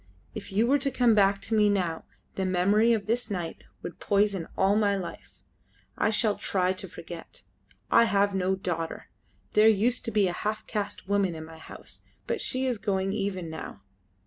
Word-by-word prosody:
If 210 - -7
you 210 +4 +2
were 280 +4 +3
to 275 +1 0
come 245 -3 +3
back 200 -1 +4
to 225 - -3
me 210 -1 +4
now, 180 -5 -1 0.3
the 190 - -2
memory 195 +5 +3
of 220 -3 +1
this 235 +1 -1
night 175 -5 -5 0.2
would - - -7
poison 200 -4 +1
all 195 +1 +3
my 205 -2 +2
life. 190 -3 -8 0.5
I - - +1
shall 215 -1 +2
try 185 -1 +1
to 185 - -7
forget. - - -10 0.5
I 235 - +6
have 200 -2 +2
no 190 0 +1
daughter. 165 -3 -4 0.4
There 210 +1 +6
used 225 +4 +2
to 230 - -2
be 210 -3 +3
a 175 - -2
half 215 +3 -3
caste 205 -3 -4
woman 200 -3 +1
in 160 0 -7
my 160 0 -12
house, - - -11 0.2
but - - -1
she 260 0 +1
is 245 -4 -1
going 195 -1 -1
even 195 -4 -2
now. 160 -10 -8
200 Hz, 190 wpm, -27 LUFS, 185-220 Hz, 0.5 s, I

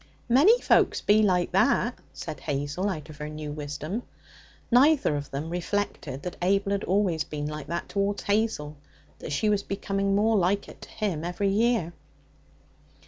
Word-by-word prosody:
'Many 310 - +6
folks - - +3
be 210 +1 +4
like 180 -4 +2
that,' 235 +5 +2
said - - -7
Hazel 145 +6 -2
out 155 -5 -5
of 150 - -13
her 150 0 -5
new 150 -1 -6
wisdom. 150 +7 -4 0.7
Neither 265 - +5
of 145 -1 -4
them 150 +4 -4
reflected 175 -6 -3
that 180 - -5
Abel 195 +2 +2
had 200 -1 0
always 185 -4 +1
been 145 -1 -5
like 150 -1 -5
that 170 +2 -3
towards 200 0 -1
Hazel, 200 -9 0 0.4
that - - -7
she 180 +9 0
was 205 -1 +2
becoming 195 0 -1
more 220 +2 +3
like 195 +2 +1
it - - -13
to - - -11
him 195 -8 -2
every 180 +3 -1
year. 215 -4 +1
190 Hz, 165 wpm, -27 LUFS, 155-205 Hz, 0.7 s, Many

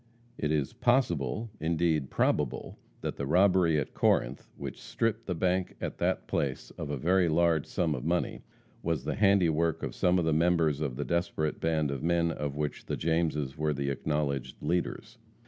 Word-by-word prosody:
It 75 - -1
is 75 -3 0
possible, 110 - +1
indeed 80 -3 +1
probable, 75 -5 0 0.2
that - - -4
the 70 - -3
robbery 90 -1 +4
at 70 - -4
Corinth, 65 +3 +1
which - - -7
stripped 115 0 -2
the 90 - -1
bank 90 +2 0
at - - -5
that - - 0
place 70 -2 -2
of 75 - -6
a 75 - -2
very 90 +5 +3
large 80 -1 +2
sum 80 -3 0
of 65 - -4
money, 85 +3 -1 0.4
was 80 -5 -1
the - - -1
handiwork 85 -6 +2
of - - -3
some 90 +1 +2
of 85 - +1
the 80 - +2
members 80 -2 +2
of 70 -5 -2
the 70 +2 -3
desperate 85 -3 -1
band 80 -3 +1
of 70 - -4
men, 85 0 +2
of 75 -3 -4
which 75 -1 -3
the - - -2
Jameses 80 -4 0
were 75 -1 +1
the 70 0 -1
acknowledged 70 -2 -2
leaders. 90 0 -2
80 Hz, 180 wpm, -29 LUFS, 75-85 Hz, 0.4 s, robbery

